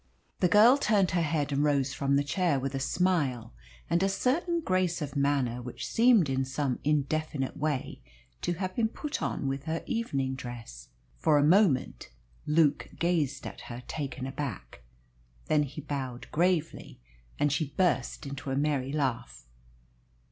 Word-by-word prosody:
The 180 Hz, -, +4 dB
girl 220 Hz, +8 st, +7 dB
turned 205 Hz, -8 st, +2 dB
her 175 Hz, 0 st, +1 dB
head 150 Hz, -2 st, 0 dB
and 140 Hz, +1 st, +1 dB
rose 140 Hz, -2 st, +1 dB
from 140 Hz, 0 st, +1 dB
the 140 Hz, -, +3 dB
chair 145 Hz, 0 st, +1 dB
with 135 Hz, +1 st, -3 dB
a 135 Hz, -, -2 dB
smile 135 Hz, -7 st, 0 dB, 0.3 s
and 170 Hz, +2 st, +1 dB
a 195 Hz, -, +2 dB
certain 315 Hz, -, 0 dB
grace 185 Hz, -, 0 dB
of 150 Hz, -2 st, -5 dB
manner 140 Hz, -4 st, +1 dB
which 125 Hz, 0 st, -6 dB
seemed 230 Hz, -7 st, +4 dB
in 135 Hz, 0 st, 0 dB
some 130 Hz, 0 st, -2 dB
indefinite 150 Hz, -1 st, -1 dB
way 145 Hz, -2 st, -2 dB, 0.4 s
to 175 Hz, -, 0 dB
have 185 Hz, +2 st, -4 dB
been 230 Hz, -2 st, +2 dB
put 290 Hz, +6 st, -5 dB
on -, -, -2 dB
with 135 Hz, +1 st, -3 dB
her 160 Hz, 0 st, -2 dB
evening 140 Hz, -, -1 dB
dress. 120 Hz, -, -8 dB, 0.3 s
For 155 Hz, -2 st, +3 dB
a 145 Hz, -, +4 dB
moment 165 Hz, -4 st, +3 dB, 0.4 s
Luke 150 Hz, -1 st, +2 dB
gazed 155 Hz, -6 st, 0 dB
at -, -, -7 dB
her, 120 Hz, +1 st, -7 dB
taken 135 Hz, -3 st, -4 dB
aback. 135 Hz, -, -6 dB, 0.6 s
Then 150 Hz, -, +3 dB
he 145 Hz, +1 st, -4 dB
bowed 135 Hz, -4 st, -5 dB
gravely, 170 Hz, -1 st, 0 dB, 0.4 s
and 145 Hz, 0 st, +2 dB
she 145 Hz, +2 st, 0 dB
burst 180 Hz, -4 st, +1 dB
into 140 Hz, 0 st, -6 dB
a 135 Hz, -, -1 dB
merry 140 Hz, -2 st, 0 dB
laugh. 130 Hz, -, -2 dB
145 Hz, 160 wpm, -29 LUFS, 135-175 Hz, 0.6 s, girl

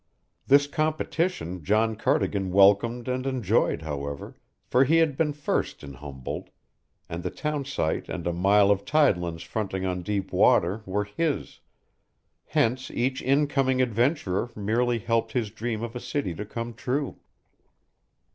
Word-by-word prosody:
This 140 Hz, +1 st, +6 dB
competition 155 Hz, -, -1 dB
John 110 Hz, +5 st, +2 dB
Cardigan 105 Hz, -6 st, 0 dB
welcomed 100 Hz, +6 st, +4 dB
and 130 Hz, +1 st, -2 dB
enjoyed, 125 Hz, -, +1 dB
however, 70 Hz, -2 st, -5 dB, 0.3 s
for 125 Hz, -, +4 dB
he 155 Hz, +5 st, +3 dB
had 160 Hz, -4 st, +3 dB
been 150 Hz, +1 st, +1 dB
first 145 Hz, -, -2 dB
in 70 Hz, -1 st, -8 dB
Humboldt, 65 Hz, -1 st, -7 dB, 0.6 s
and 85 Hz, +1 st, -5 dB
the -, -, -2 dB
townsite 145 Hz, -, -2 dB
and -, -, -5 dB
a 85 Hz, -, 0 dB
mile 100 Hz, +3 st, +4 dB
of 100 Hz, -1 st, +1 dB
tidelands 90 Hz, -, +1 dB
fronting 95 Hz, -3 st, -3 dB
on 90 Hz, -1 st, -2 dB
deep 100 Hz, +1 st, -3 dB
water 95 Hz, +6 st, +3 dB
were 105 Hz, +2 st, -1 dB
his; 145 Hz, +9 st, -2 dB, 0.9 s
hence 130 Hz, +3 st, 0 dB
each 130 Hz, +2 st, -1 dB
incoming 135 Hz, -1 st, +2 dB
adventurer 120 Hz, -, +1 dB
merely 115 Hz, +4 st, +1 dB
helped 115 Hz, 0 st, -1 dB
his 110 Hz, -5 st, -1 dB
dream 115 Hz, 0 st, -3 dB
of 120 Hz, +1 st, -5 dB
a -, -, -3 dB
city 130 Hz, -9 st, -2 dB
to 105 Hz, +6 st, -6 dB
come 115 Hz, +2 st, -5 dB
true. 130 Hz, +4 st, -3 dB
115 Hz, 140 wpm, -26 LUFS, 95-135 Hz, 0.9 s, This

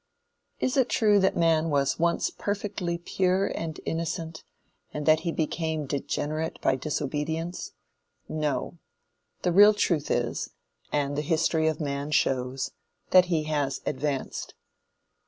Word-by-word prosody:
Is 255 Hz, -, 0 dB
it 255 Hz, -2 st, +3 dB
true 210 Hz, -3 st, +4 dB
that 190 Hz, 0 st, +2 dB
man 165 Hz, -1 st, +3 dB
was 140 Hz, 0 st, +1 dB
once 170 Hz, 0 st, +1 dB
perfectly 200 Hz, -4 st, -3 dB
pure 185 Hz, +2 st, +1 dB
and 160 Hz, -4 st, -4 dB
innocent, 165 Hz, -1 st, -3 dB, 0.5 s
and 150 Hz, -1 st, -4 dB
that 155 Hz, 0 st, +5 dB
he 170 Hz, -, -2 dB
became 160 Hz, -1 st, -2 dB
degenerate 150 Hz, +3 st, -2 dB
by 130 Hz, -, +2 dB
disobedience? 150 Hz, +4 st, -3 dB, 0.5 s
No. 155 Hz, +2 st, -2 dB, 0.6 s
The 180 Hz, -, +2 dB
real 205 Hz, +4 st, +7 dB
truth 170 Hz, -7 st, +1 dB
is, 120 Hz, -1 st, -1 dB, 0.4 s
and 145 Hz, -1 st, 0 dB
the 150 Hz, -, 0 dB
history 160 Hz, 0 st, +1 dB
of 155 Hz, -, 0 dB
man 140 Hz, -1 st, -3 dB
shows, 130 Hz, -2 st, 0 dB, 0.4 s
that 185 Hz, -1 st, +7 dB
he 165 Hz, -3 st, 0 dB
has 145 Hz, -3 st, -1 dB
advanced. 135 Hz, 0 st, -3 dB
160 Hz, 130 wpm, -27 LUFS, 145-170 Hz, 0.6 s, real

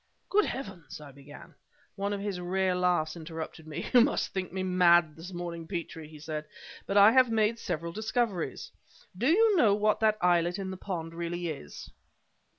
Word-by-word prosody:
"Good 420 Hz, +1 st, +4 dB
heavens!" 195 Hz, -, -7 dB
I 150 Hz, -2 st, -11 dB
began 140 Hz, +2 st, -14 dB, 0.4 s
One 200 Hz, 0 st, -2 dB
of 205 Hz, -, -2 dB
his 200 Hz, -2 st, -3 dB
rare 185 Hz, +1 st, 0 dB
laughs 180 Hz, -3 st, +1 dB
interrupted 160 Hz, -1 st, -8 dB
me. 155 Hz, -, -5 dB
"You 245 Hz, -, +8 dB
must 275 Hz, +5 st, +1 dB
think 185 Hz, -3 st, -3 dB
me 190 Hz, +1 st, -3 dB
mad 175 Hz, -4 st, +4 dB
this 165 Hz, +3 st, -10 dB
morning, 170 Hz, -2 st, -6 dB
Petrie!" 165 Hz, -3 st, -6 dB
he 155 Hz, 0 st, -13 dB
said. 155 Hz, 0 st, -5 dB, 0.4 s
"But 200 Hz, -, 0 dB
I 205 Hz, +2 st, +8 dB
have 255 Hz, 0 st, +5 dB
made 225 Hz, 0 st, +1 dB
several 170 Hz, -3 st, -4 dB
discoveries. 215 Hz, -, -2 dB, 0.4 s
Do 230 Hz, +8 st, -1 dB
you 420 Hz, +6 st, +4 dB
know 215 Hz, -10 st, +5 dB
what 210 Hz, +1 st, +1 dB
that 215 Hz, -1 st, +3 dB
islet 175 Hz, 0 st, +2 dB
in 190 Hz, -1 st, -4 dB
the -, -, -5 dB
pond 165 Hz, -4 st, -5 dB
really 170 Hz, 0 st, -4 dB
is?" 105 Hz, -, -8 dB
180 Hz, 180 wpm, -29 LUFS, 165-205 Hz, 0.4 s, You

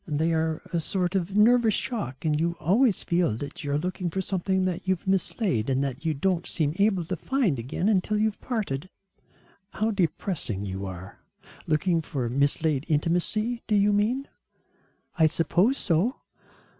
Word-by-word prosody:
They 160 Hz, +2 st, 0 dB
are 160 Hz, -1 st, -1 dB
a 170 Hz, -, +2 dB
sort 180 Hz, +3 st, -1 dB
of 190 Hz, 0 st, -1 dB
nervous 225 Hz, +1 st, +5 dB
shock 150 Hz, -, -3 dB
and 150 Hz, -1 st, +2 dB
you 170 Hz, +1 st, 0 dB
always 215 Hz, -, +3 dB
feel 170 Hz, -11 st, +1 dB
that 145 Hz, +5 st, -7 dB
you 145 Hz, -, -3 dB
are 145 Hz, -, +2 dB
looking 180 Hz, +2 st, -2 dB
for 190 Hz, -, -3 dB
something 190 Hz, 0 st, 0 dB
that 185 Hz, 0 st, -3 dB
you've 185 Hz, -2 st, 0 dB
mislaid 190 Hz, -, 0 dB
and 135 Hz, +1 st, +1 dB
that 140 Hz, +2 st, -4 dB
you 160 Hz, -2 st, +1 dB
don't 175 Hz, +3 st, 0 dB
seem 150 Hz, -3 st, 0 dB
able 200 Hz, -4 st, +2 dB
to 185 Hz, -, -3 dB
find 200 Hz, -, 0 dB
again 130 Hz, -, -2 dB
until 210 Hz, 0 st, +2 dB
you've 215 Hz, 0 st, 0 dB
parted." 185 Hz, -, -3 dB, 0.8 s
"How 220 Hz, +2 st, 0 dB
depressing 165 Hz, -, -2 dB
you 95 Hz, 0 st, -4 dB
are. 95 Hz, +1 st, -9 dB, 0.5 s
Looking 165 Hz, +2 st, +2 dB
for 130 Hz, -6 st, -3 dB
mislaid 140 Hz, +2 st, +1 dB
intimacy, 180 Hz, +10 st, 0 dB
do 215 Hz, -, +2 dB
you 205 Hz, 0 st, +4 dB
mean?" 235 Hz, +7 st, +1 dB, 0.9 s
"I 160 Hz, -, +6 dB
suppose 175 Hz, -, +2 dB
so." 190 Hz, -, +1 dB
175 Hz, 165 wpm, -26 LUFS, 150-205 Hz, 0.9 s, I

